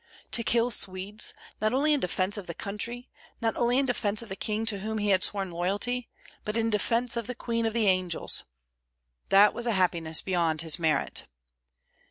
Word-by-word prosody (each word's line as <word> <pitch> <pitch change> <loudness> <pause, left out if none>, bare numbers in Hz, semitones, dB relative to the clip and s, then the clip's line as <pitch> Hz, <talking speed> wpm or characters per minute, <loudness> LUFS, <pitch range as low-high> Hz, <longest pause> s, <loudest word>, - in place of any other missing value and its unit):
To 235 - +1
kill 235 +2 +2
Swedes, 195 +1 +1 0.3
not 215 +2 +1
only 300 +3 +3
in 290 - +2
defence 185 +1 0
of 205 -4 -3
the 170 - -5
country, 230 +6 -3 0.3
not 225 -2 0
only 240 +1 +2
in 275 - +3
defence 220 -4 0
of 230 - -12
the 190 - -4
king 215 +2 -2
to 210 -3 0
whom 220 +2 -3
he 205 -1 0
had 190 -1 +4
sworn 195 -3 -1
loyalty, 205 +8 -1 0.3
but 210 +2 -2
in 225 0 +1
defence 230 +3 0
of 235 -2 -3
the 250 - -4
Queen 230 -2 -1
of 220 - -2
the 230 -2 +1
Angels, 185 -3 +1 0.8
that 200 +2 +6
was 235 0 -1
a 235 - +2
happiness 170 -4 +1
beyond 170 -4 +1
his 160 +1 +1
merit. 160 -2 0
210 Hz, 195 wpm, -28 LUFS, 185-235 Hz, 0.8 s, that